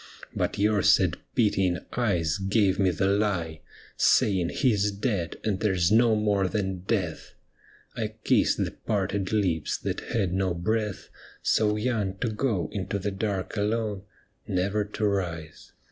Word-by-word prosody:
But - - -1
your 105 0 +2
sad - - +4 0.2
pitying 95 -5 +2 0.2
eyes 90 -8 0
gave 95 0 +2
me 95 -2 +4
the 90 +2 0
lie. 95 -6 0 0.4
Saying 95 -4 +3
he 125 -5 +2
's 105 +1 +1
dead, 100 -4 -2
and 100 -4 -1
there 105 -3 +1
's 85 +1 +2
no 115 0 +5
more 105 -3 +1
than 95 -1 -2
death. 90 -3 -3 0.6
I - - -3
kissed - - +3
the - - -5
parted 100 -2 -2
lips 90 -8 0
that - - -3
had 95 -6 -1
no 95 -2 0
breath, 105 +3 -2 0.3
So 105 -1 +2
young 105 -4 -1
to 115 - -1
go 105 - -1
into 100 -1 -2
the 100 +1 -3
dark 95 -1 -3
alone. 105 -1 -1 0.5
Never 100 +3 0
to 105 +1 -3
rise. 85 -6 -3
100 Hz, 150 wpm, -27 LUFS, 95-105 Hz, 0.6 s, no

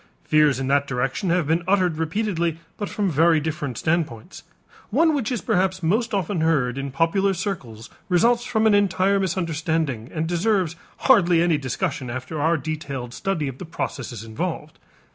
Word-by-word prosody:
Fears 150 -3 +3
in 135 - -2
that 140 +1 +2
direction 135 +7 -1
have 175 -2 +2
been 160 +3 +1
uttered 185 -5 +2
repeatedly, 170 -1 -1 0.2
but 205 - -4
from 200 -3 -1
very 160 +2 +4
different 150 -5 -4
standpoints. 155 -9 -2 0.5
One 320 +7 +3
which 270 -5 -1
is 240 -6 -1
perhaps 185 0 0
most 220 +8 +1
often 195 -3 -1
heard 135 -6 +1
in 140 0 -3
popular 170 +7 +1
circles 145 - -5 0.2
results 235 +7 +3
from 220 -3 0
an 220 - +5
entire 200 0 +3
misunderstanding 160 - -1
and 155 0 -2
deserves 175 0 +1 0.3
hardly 175 -9 +5
any 165 -4 +2
discussion 140 0 -3
after 130 +5 -4
our 165 +2 +3
detailed 140 -5 -5
study 170 -4 -2
of 135 -1 -6
the - - -6
processes 120 -7 -5
involved. 110 -1 -5
165 Hz, 160 wpm, -23 LUFS, 140-190 Hz, 0.5 s, an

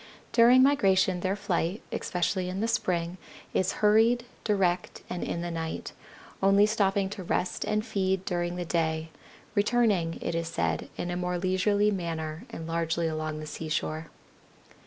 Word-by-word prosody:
During 245 +2 +7
migration 190 -9 +3
their 190 +2 0
flight, 185 0 -1
especially 180 +1 -1
in 185 +1 -3
the 225 - 0
spring, 180 -5 -1 0.3
is 185 - +1
hurried, 225 +3 +4 0.2
direct 185 -4 0
and 180 - -3
in 170 - -3
the 175 0 -3
night, 165 -1 -4 0.5
only 195 +1 +5
stopping 200 -2 +1
to 205 -2 -6
rest 180 +1 -1
and 215 +1 0
feed 190 -4 0
during 175 -1 -1
the 180 0 -3
day, 160 -1 -1 0.4
returning, 205 -6 +2
it - - -3
is 165 0 -1
said, 85 - -1
in 175 - -3
a - - -2
more 180 0 -1
leisurely 195 +3 +2
manner 165 -4 -4
and 165 - -7
largely 165 0 -1
along 155 -1 -3
the - - -6
seashore. 155 0 -3
180 Hz, 155 wpm, -28 LUFS, 165-205 Hz, 0.5 s, During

